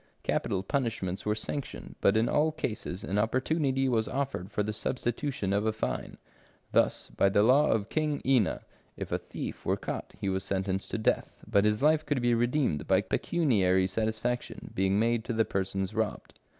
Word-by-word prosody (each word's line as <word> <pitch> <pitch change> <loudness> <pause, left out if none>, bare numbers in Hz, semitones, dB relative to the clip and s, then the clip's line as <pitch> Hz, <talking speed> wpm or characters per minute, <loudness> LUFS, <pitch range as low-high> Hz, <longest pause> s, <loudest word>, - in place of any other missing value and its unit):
Capital 95 - 0
punishments 110 -7 -2
were 105 - +2
sanctioned, 135 +5 -5
but 100 - +4
in 115 +2 +3
all 155 +2 +2
cases 110 - -4
an 100 +2 -1
opportunity 135 +4 +1
was 115 -4 +1
offered 135 -9 -3
for 105 0 0
the 105 +1 -2
substitution 120 -1 -2
of 105 +2 +1
a - - +3
fine. 110 - -4 0.5
Thus, - - +1
by 95 +11 +3
the 100 +1 +4
law 135 +6 +5
of 105 -2 +1
King 150 -2 0
Ina, 130 -7 +2 0.4
if - - -5
a - - 0
thief - - -7
were - - +1
caught, - - -5
he - - -2
was 95 0 0
sentenced 95 0 -2
to - - -2
death, 110 - 0
but 100 +1 +3
his 105 +4 +1
life 155 +1 +4
could 145 -3 0
be 120 0 +2
redeemed 120 - +1
by 95 0 +4
pecuniary 100 - +2
satisfaction 110 +5 -2
being 95 +1 +2
made 115 +1 +2
to 120 - -2
the 110 0 +2
persons 95 0 -2
robbed. 110 -1 -2
110 Hz, 180 wpm, -29 LUFS, 100-130 Hz, 0.5 s, law